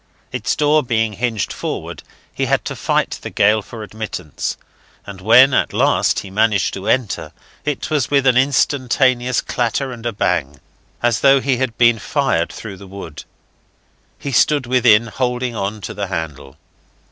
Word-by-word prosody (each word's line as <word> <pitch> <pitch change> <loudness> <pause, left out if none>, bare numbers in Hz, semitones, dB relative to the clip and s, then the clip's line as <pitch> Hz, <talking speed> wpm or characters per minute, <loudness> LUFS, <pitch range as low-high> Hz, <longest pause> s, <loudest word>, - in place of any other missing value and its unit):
Its - - -1
door 150 +1 +3
being 115 -4 0
hinged 115 -2 -2
forward, - - -5 0.3
he - - -1
had - - 0
to - - -4
fight - - -1
the - - -6
gale 105 +1 +3
for 110 +2 -9
admittance, 100 -7 -5 0.5
and 100 -2 -9
when 125 +6 +6
at - - +1
last - - +2
he 95 - -11
managed 105 -2 +1
to 95 +1 -6
enter, 125 -6 0 0.3
it 150 -1 -3
was 145 -5 +1
with 140 -2 +2
an 130 -2 +4
instantaneous 130 -2 +2
clatter 125 +2 -2
and 120 -1 -6
a - - -1
bang, 70 - -1 0.4
as 120 -2 +2
though 135 0 +5
he 135 -1 0
had 125 -3 -2
been 120 -2 +4
fired 120 - 0
through 100 -4 -8
the 100 +1 -12
wood. 95 -5 -9 0.9
He 140 - -5
stood 140 +3 +3
within, 120 -3 +4
holding 125 +2 -2
on 105 +1 -3
to - - -6
the 100 0 -4
handle. 75 -6 -6
115 Hz, 165 wpm, -19 LUFS, 100-130 Hz, 0.9 s, when